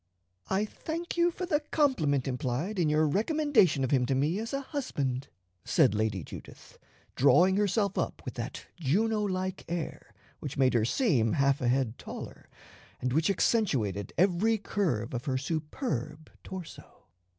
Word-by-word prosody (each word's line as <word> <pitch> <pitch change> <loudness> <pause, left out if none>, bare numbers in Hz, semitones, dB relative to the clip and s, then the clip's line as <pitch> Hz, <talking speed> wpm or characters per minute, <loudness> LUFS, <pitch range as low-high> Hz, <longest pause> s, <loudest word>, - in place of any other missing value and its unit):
"I 195 +2 +1
thank 330 +9 -5
you 345 0 +4
for 365 +2 -4
the 310 -5 +1
compliment 255 - +1
implied 130 - -2
in 165 -3 +3
your 155 +1 +3
recommendation 215 - +3
of 130 - -1
him 125 -3 +3
to 135 - +1
me 150 +8 +1
as 230 +1 -4
a 275 - -1
husband," 140 - -3 0.4
said - - +3
Lady 105 -4 -1
Judith, - - -12 0.4
drawing 175 +7 +5
herself 200 -1 +1
up - - -3
with - - -5
that - - -6
Juno 210 +9 +1
like 190 -1 -2
air 170 -2 -4 0.3
which 145 +1 -6
made 130 -1 +3
her 115 -3 +3
seem 125 - +2
half 140 0 +2
a 125 - +1
head 125 -2 0
taller, - - -9 0.5
and 125 0 -1
which 160 +4 +2
accentuated 125 - +1
every 195 +5 +3
curve 165 - -1
of 120 +2 -4
her 130 -3 0
superb 150 - -3
torso. 185 -3 -9
160 Hz, 155 wpm, -29 LUFS, 130-210 Hz, 0.5 s, drawing